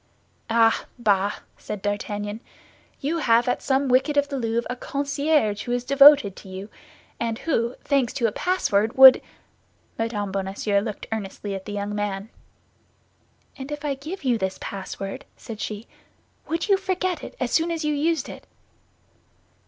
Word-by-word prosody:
"Ah, 225 Hz, 0 st, +3 dB
bah!" 205 Hz, -4 st, +2 dB, 0.3 s
said 210 Hz, -2 st, -6 dB
D'Artagnan; 205 Hz, +1 st, -3 dB, 0.6 s
"you 320 Hz, +5 st, -1 dB
have 235 Hz, -4 st, +3 dB
at 245 Hz, -, 0 dB
some 270 Hz, +1 st, +1 dB
wicket 265 Hz, +4 st, +2 dB
of 285 Hz, 0 st, +2 dB
the 280 Hz, -, -3 dB
Louvre 230 Hz, 0 st, -1 dB
a 250 Hz, -, -3 dB
concierge 280 Hz, -5 st, 0 dB
who 240 Hz, -, -4 dB
is 245 Hz, 0 st, -1 dB
devoted 275 Hz, -5 st, +7 dB
to 195 Hz, -, -12 dB
you, 190 Hz, +2 st, -7 dB, 0.5 s
and 230 Hz, -1 st, -2 dB
who, 240 Hz, -6 st, -1 dB
thanks 275 Hz, -4 st, +1 dB
to 240 Hz, -, -1 dB
a 225 Hz, -, +2 dB
password, 225 Hz, -, +1 dB
would—" 265 Hz, -1 st, +10 dB, 0.8 s
Mme. 210 Hz, -3 st, -2 dB
Bonacieux 195 Hz, +1 st, 0 dB
looked 210 Hz, 0 st, -5 dB
earnestly 205 Hz, -1 st, -4 dB
at 190 Hz, -1 st, -6 dB
the 205 Hz, -, -6 dB
young 205 Hz, 0 st, -3 dB
man. 205 Hz, 0 st, -3 dB, 1.3 s
"And 270 Hz, +1 st, -8 dB
if 295 Hz, 0 st, -5 dB
I 285 Hz, -, 0 dB
give 305 Hz, +7 st, -7 dB
you 245 Hz, -4 st, +1 dB
this 190 Hz, -1 st, -2 dB
password," 195 Hz, 0 st, -6 dB
said 220 Hz, -2 st, -8 dB
she, 210 Hz, +1 st, -5 dB, 0.6 s
"would 330 Hz, +5 st, -2 dB
you 395 Hz, -2 st, +4 dB
forget 370 Hz, -2 st, -2 dB
it -, -, -8 dB
as -, -, -1 dB
soon 330 Hz, +1 st, +2 dB
as 330 Hz, -2 st, -2 dB
you 300 Hz, -, +1 dB
used 315 Hz, +1 st, 0 dB
it?" -, -, -10 dB
235 Hz, 160 wpm, -24 LUFS, 205-285 Hz, 1.3 s, would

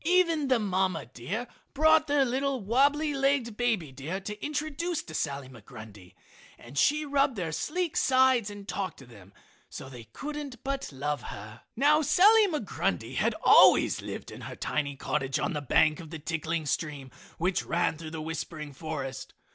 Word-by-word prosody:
Even 335 Hz, -3 st, +3 dB
the 255 Hz, -2 st, +4 dB
mama 190 Hz, -4 st, 0 dB
deer 130 Hz, -, -5 dB, 0.3 s
brought 315 Hz, +2 st, +5 dB
their 285 Hz, -1 st, +3 dB
little, 265 Hz, +2 st, -1 dB
wabbly 280 Hz, +8 st, +2 dB
legged 275 Hz, -4 st, +1 dB
baby 220 Hz, -, 0 dB
deer 150 Hz, +8 st, -5 dB
to 210 Hz, +2 st, -7 dB
introduce 310 Hz, +3 st, -2 dB
to 160 Hz, -, -11 dB
Sally 140 Hz, -3 st, -3 dB
Migrundy; 105 Hz, -5 st, -13 dB, 0.4 s
and 120 Hz, +4 st, -13 dB
she 300 Hz, -, +3 dB
rubbed 275 Hz, -2 st, +2 dB
their 175 Hz, -5 st, -3 dB
sleek 340 Hz, -, -2 dB
sides 260 Hz, -4 st, +3 dB
and 205 Hz, -1 st, -10 dB
talked 195 Hz, -2 st, -3 dB
to 135 Hz, -, -13 dB
them 100 Hz, -6 st, -16 dB, 0.4 s
so 135 Hz, -, -8 dB
they 120 Hz, -3 st, -10 dB
couldn't 285 Hz, -, -7 dB
but 275 Hz, -, -3 dB
love 145 Hz, +2 st, -3 dB
her. 110 Hz, +3 st, -9 dB
Now 295 Hz, +5 st, +4 dB
Sally 415 Hz, +7 st, +6 dB
Migrundy 310 Hz, -5 st, -2 dB
had -, -, +1 dB
always -, -, +6 dB
lived -, -, -7 dB
in -, -, -10 dB
her -, -, -7 dB
tiny 140 Hz, -2 st, -2 dB
cottage 135 Hz, -1 st, -1 dB
on -, -, -1 dB
the 150 Hz, -, -3 dB
bank 150 Hz, +2 st, +3 dB
of 165 Hz, -3 st, -9 dB
the 160 Hz, -, -6 dB
tinkling 160 Hz, +1 st, -3 dB
stream 145 Hz, -3 st, -3 dB, 0.3 s
which 180 Hz, +3 st, 0 dB
ran 170 Hz, -1 st, 0 dB
through 160 Hz, -1 st, -7 dB
the 160 Hz, 0 st, -6 dB
whispering 155 Hz, -1 st, -5 dB
forest. 140 Hz, -3 st, -6 dB
190 Hz, 170 wpm, -28 LUFS, -, 0.4 s, Sally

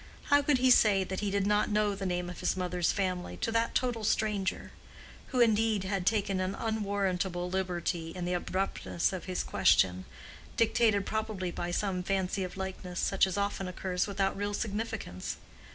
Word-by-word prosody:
How 285 Hz, 0 st, +7 dB
could 285 Hz, -1 st, +3 dB
he 255 Hz, 0 st, +4 dB
say 205 Hz, -5 st, +5 dB
that 190 Hz, 0 st, -4 dB
he 210 Hz, -, -1 dB
did 200 Hz, 0 st, 0 dB
not 210 Hz, +1 st, +2 dB
know 210 Hz, -1 st, +2 dB
the 195 Hz, -1 st, -3 dB
name 180 Hz, -1 st, -1 dB
of 180 Hz, -, -7 dB
his -, -, 0 dB
mother's 180 Hz, -1 st, 0 dB
family 185 Hz, -3 st, -2 dB
to 225 Hz, -, -1 dB
that 230 Hz, 0 st, 0 dB
total 245 Hz, -3 st, 0 dB
stranger?—who 210 Hz, +4 st, -3 dB
indeed 220 Hz, -3 st, +3 dB
had 190 Hz, -1 st, -2 dB
taken 200 Hz, -3 st, +1 dB
an 185 Hz, +1 st, -1 dB
unwarrantable 195 Hz, -5 st, -1 dB
liberty 175 Hz, -3 st, -2 dB
in 175 Hz, +1 st, -5 dB
the 180 Hz, -, -1 dB
abruptness 185 Hz, 0 st, -1 dB
of 185 Hz, -, -5 dB
his 185 Hz, -1 st, -2 dB
question, 95 Hz, 0 st, +3 dB, 0.5 s
dictated 220 Hz, -3 st, +3 dB
probably 215 Hz, -4 st, -2 dB
by 175 Hz, 0 st, -4 dB
some 185 Hz, 0 st, -1 dB
fancy 190 Hz, +1 st, -1 dB
of 185 Hz, +1 st, -6 dB
likeness 185 Hz, -2 st, -5 dB
such 195 Hz, -1 st, +3 dB
as 190 Hz, -, -3 dB
often 200 Hz, -1 st, -1 dB
occurs 180 Hz, 0 st, -2 dB
without 195 Hz, -1 st, 0 dB
real 205 Hz, +1 st, -2 dB
significance. 215 Hz, -, -4 dB
195 Hz, 170 wpm, -30 LUFS, 180-210 Hz, 0.5 s, How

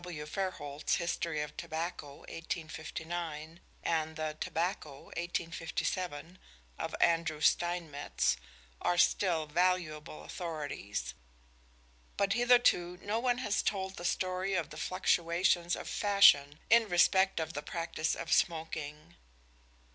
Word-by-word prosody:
W. 165 Hz, -4 st, -6 dB
Fairholt's 150 Hz, -4 st, -2 dB
"History 170 Hz, -2 st, -1 dB
of 150 Hz, 0 st, -8 dB
Tobacco," 160 Hz, -3 st, -5 dB
1859, 160 Hz, 0 st, -5 dB, 0.2 s
and 160 Hz, -1 st, 0 dB
the 155 Hz, -1 st, -3 dB
"Tobacco" 165 Hz, -5 st, -2 dB
(1857) 170 Hz, 0 st, -3 dB, 0.4 s
of -, -, -3 dB
Andrew 165 Hz, -2 st, +2 dB
Steinmetz, 165 Hz, -3 st, +1 dB, 0.5 s
are 175 Hz, -, +1 dB
still 175 Hz, -3 st, +3 dB
valuable 155 Hz, -, 0 dB
authorities 145 Hz, -, -4 dB, 1.0 s
but 200 Hz, 0 st, +2 dB
hitherto 240 Hz, -7 st, +4 dB
no 210 Hz, +3 st, 0 dB
one 245 Hz, 0 st, +1 dB
has 210 Hz, -5 st, 0 dB
told 190 Hz, -2 st, -2 dB
the 175 Hz, -, -7 dB
story 185 Hz, +2 st, 0 dB
of 170 Hz, -3 st, -1 dB
the 155 Hz, -, -8 dB
fluctuations 175 Hz, 0 st, +2 dB
of -, -, -7 dB
fashion 150 Hz, -9 st, +5 dB
in 230 Hz, -2 st, +6 dB
respect 190 Hz, +2 st, +4 dB
of 160 Hz, 0 st, -3 dB
the 145 Hz, -, -3 dB
practice 160 Hz, 0 st, -2 dB
of -, -, -2 dB
smoking. 160 Hz, -2 st, -1 dB
170 Hz, 110 wpm, -32 LUFS, 155-185 Hz, 1.0 s, in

